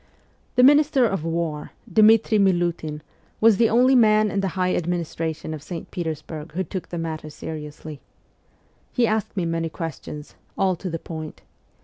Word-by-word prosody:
The 250 - +5
Minister 290 -1 +5
of 195 -8 -1
War, 165 -2 -3
Dmitri 220 0 +5
Miliitin, 175 -5 0 0.4
was 220 -2 +5
the 230 -1 +4
only 250 +3 +4
man 215 -4 +4
in 200 - -1
the 195 - 0
high 185 0 +1
administration 165 -2 -3
of 155 - -7
St. 170 +1 -8
Petersburg 160 -2 -5
who 185 +3 -1
took 185 +1 -6
the 175 - -5
matter 160 -2 -4
seriously. 150 -1 -8 0.9
He 245 - +2
asked 215 -2 -1
me 180 - 0
many 165 0 -1
ques 165 -2 -6
tions: 150 0 -9 0.2
all 190 -1 +2
to 185 - -5
the 165 - -3
point. 160 -1 -8
175 Hz, 160 wpm, -23 LUFS, 160-215 Hz, 0.9 s, The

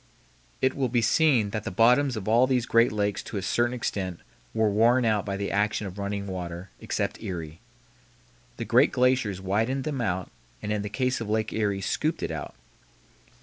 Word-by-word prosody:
It 130 - +3
will 130 -2 0
be 120 -1 +1
seen 120 -4 +3
that 110 -1 -3
the - - -3
bottoms 125 +6 +3
of 105 - -6
all 115 +3 +5
of - - -6
these 125 -3 +2
great 115 +1 +4
lakes 105 -1 -1
to 105 - -6
a 95 - -3
certain 120 +5 +1
extent 95 -7 -3 0.3
were 110 - +2
worn 115 +4 +3
out 105 -2 +1
by 100 -1 -2
the 100 0 -3
action 105 +1 0
of 95 +1 -7
running 100 0 -3
water, 90 -1 -6
except - - -3
Erie. 85 -7 -6 1.0
The - - -4
great - - +4
glaciers 125 -6 +2
widened 110 +8 0
them 140 -3 -2
out, 95 -5 -2 0.3
and 105 0 -3
in 105 - -1
the 105 - -4
case 130 +2 -1
of 110 - -4
Lake 110 0 0
Erie 100 -3 0
scooped 155 - -1
it - - -2
out. - - -6
110 Hz, 195 wpm, -26 LUFS, 100-125 Hz, 1.0 s, all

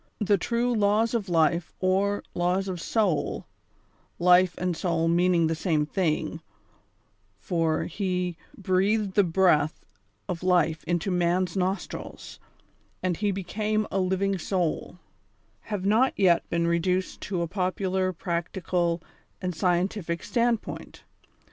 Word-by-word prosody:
The 210 -1 +2
true 240 +3 0
Laws 215 +1 +2
of 210 -5 -1
Life, 170 0 +1
or 195 +2 +1
Laws 180 +2 0
of 180 -3 -4
Soul 200 -8 0 0.7
(life 180 0 +5
and 180 -1 -1
soul 165 -2 0
meaning 175 0 +3
the 160 - +1
same 160 -2 0
thing 160 -1 -1 0.5
— - - -42
for 165 -3 +1
He 180 -1 -2 0.2
"breathed 195 +2 +1
the 205 - +5
breath 165 -4 +2 0.4
of 170 - -4
life 175 -3 +2
into 175 +3 -1
man's 180 0 +1
nostrils, 190 0 -4 0.6
and 180 -3 0
he 205 -1 0
became 210 +3 -1
a 195 - 0
living 190 +1 0
soul"), 180 -2 -2 0.7
have 205 -3 -3
not 225 +6 +3
yet 180 -4 +3
been 170 0 0
reduced 180 +2 0
to 180 -4 -2
a - - -2
popular, 185 +1 -1
practical 170 0 -2 0.4
and 180 -1 -3
scientific 175 0 -1
stand 235 -2 +1
point. - - -9
185 Hz, 130 wpm, -26 LUFS, 170-195 Hz, 0.7 s, life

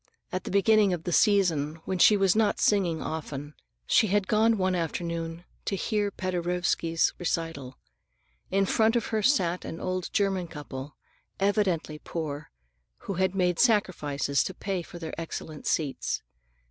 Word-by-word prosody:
At 185 - -3
the - - -4
beginning 200 0 +4
of 170 -2 -4
the 175 - -3
season, 170 -7 +3
when 190 -1 -2
she 210 - +7
was 195 -1 +3
not 215 -1 +2
singing 180 -6 +2
often, 150 -2 -5 0.3
she 220 - +4
had 200 0 +1
gone 220 +2 +3
one 185 -1 +1
afternoon 170 0 -3 0.2
to 200 - -1
hear 205 +1 0
Paderewski's 175 -3 0
recital. 165 -7 -3 0.7
In 195 +1 +2
front 220 +4 +2
of 235 - +1
her 215 - +2
sat 185 -8 +2
an 165 - -6
old 185 -1 -3
German 195 -3 0
couple, 145 -3 -8 0.4
evidently 195 -6 0
poor 150 -3 -5 0.5
people - - -22
who 195 - -2
had 190 0 +1
made 180 -2 +1
sacrifices 150 - +2
to 190 - -5
pay 195 -3 -2
for 170 - -10
their 160 -2 -6
excellent 160 -2 -6
seats. 145 -4 -1
180 Hz, 155 wpm, -27 LUFS, 165-200 Hz, 0.7 s, she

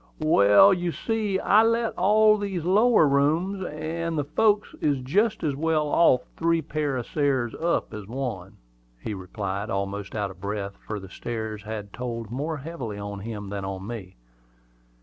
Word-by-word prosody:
"Well, 155 - +6
you 175 -1 -1
see, 215 0 -1
I 205 +2 +5
let 230 0 +1
all 215 +3 +5
these 195 -5 -3
lower 205 0 +4
rooms; 160 +8 +1
and 165 +1 -3
the 145 - +1
folks 205 +8 +1
is 145 -3 +1
jest 210 - +1
as 145 -3 0
well 155 0 0
off 140 -6 +4
up - - -26
three 165 0 +1
pair 150 -3 -2
of 120 - -4
stairs 135 -5 0
as - - -10
up 170 +1 0
one," 110 -6 -5 0.4
he 105 - -5
replied, 100 +1 -4
almost 100 +1 -3
out 100 -2 -2
of 90 -1 -16
breath, 100 0 -4
for 105 -1 -3
the 95 -1 -11
stairs 110 -1 -5 0.3
told 115 -3 -5
more 150 +5 -3
heavily 135 -8 -6
on 100 0 -6
him 105 -1 -6
than 100 -1 -4
on 95 0 -5
me. 105 -5 -7
140 Hz, 170 wpm, -25 LUFS, 105-170 Hz, 0.4 s, Well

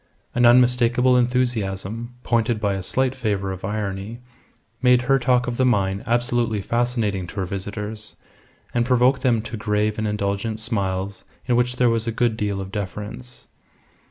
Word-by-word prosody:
An 120 0 +4
unmistakable 125 +1 +4
enthusiasm, 120 -2 -1
pointed 115 -1 +1
by 100 -2 0
a 95 - -3
slight 130 +7 0
flavour 105 -7 -2
of 95 -1 -7
irony, 105 +2 -3 0.6
made 125 -1 +4
her 135 +2 +3
talk 125 -1 +2
of 120 -1 -3
the 130 - +2
mine 100 -5 +1
absolutely 120 -2 +1
fascinating 115 -4 -1
to - - -11
her 95 -3 -1
visitors, 105 +3 -5 0.6
and 120 - +2
provoked 125 +1 +3
them 120 -5 +2
to 115 0 -6
grave 105 +1 0
and 110 - -1
indulgent 105 +1 -2
smiles 100 -3 -2 0.2
in 125 - +2
which 125 +1 +1
there 125 -1 +3
was 115 0 -1
a - - +1
good 115 0 +1
deal 100 -2 -2
of 95 0 -6
deference. 105 +5 -6
115 Hz, 160 wpm, -22 LUFS, 100-125 Hz, 0.6 s, An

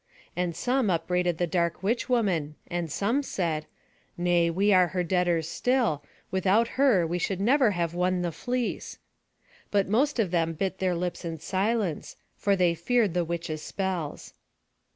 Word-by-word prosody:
And 175 -1 -1
some 250 +4 +1
upbraided 180 0 0
the 175 - +1
dark 170 +1 -1
witch 230 +5 0
woman, 180 -12 +1
and 175 -3 -3
some 230 - +1
said: 165 - -2 0.5
"Nay, 175 -1 +2
we 200 +5 +2
are 185 -1 +5
her 180 0 -1
debtors 175 -2 +1
still; 235 - 0 0.3
without 195 +5 +2
her 255 -11 +3
we 175 +2 -2
should 190 +1 -1
never 250 +4 +4
have 170 -1 -1
won 180 0 0
the 175 - -1
fleece." 245 +8 -3 0.7
But 200 -2 +2
most 265 +9 +2
of 205 -7 +1
them 165 -2 +1
bit 190 +4 -3
their 185 -2 +1
lips 175 +2 -3
in 165 -1 -4
silence, 195 -1 -1 0.2
for 200 -1 +1
they 180 -3 +3
feared 210 +3 +1
the 175 -1 +1
witch's 165 -2 -4
spells. 185 -6 -4
180 Hz, 160 wpm, -27 LUFS, 170-210 Hz, 0.7 s, are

